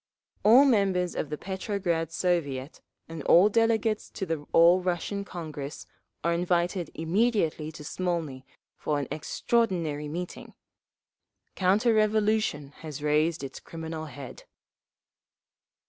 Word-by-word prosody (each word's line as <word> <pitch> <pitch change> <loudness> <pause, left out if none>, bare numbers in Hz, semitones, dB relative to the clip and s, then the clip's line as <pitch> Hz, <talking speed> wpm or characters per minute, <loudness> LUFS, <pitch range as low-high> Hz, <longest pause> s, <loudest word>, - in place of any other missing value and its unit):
All 245 +7 +7
members 195 -8 +2
of 150 - -3
the 150 - -4
Petrograd 190 -4 -2
Soviet 160 -6 -1 0.3
and 165 -1 -7
all 180 +5 +6
delegates 225 -1 +1
to 190 - -5
the 160 -4 -4
All 170 +2 +6
Russian 185 +3 -2
Congress 155 -6 -7 0.4
are 170 - +2
invited 175 0 0
immediately 165 -3 0
to 150 - -10
Smolny 165 -6 -3 0.3
for 150 - -1
an 145 - -3
extraordinary 165 -4 -1
meeting. 175 +4 -6 1.0
Counter 205 +6 +3
revolution 215 -8 +1
has 150 -3 -8
raised 150 +2 +1
its 135 - -7
criminal 160 -1 -6
head. 140 -3 -10
170 Hz, 115 wpm, -27 LUFS, 155-200 Hz, 1.0 s, All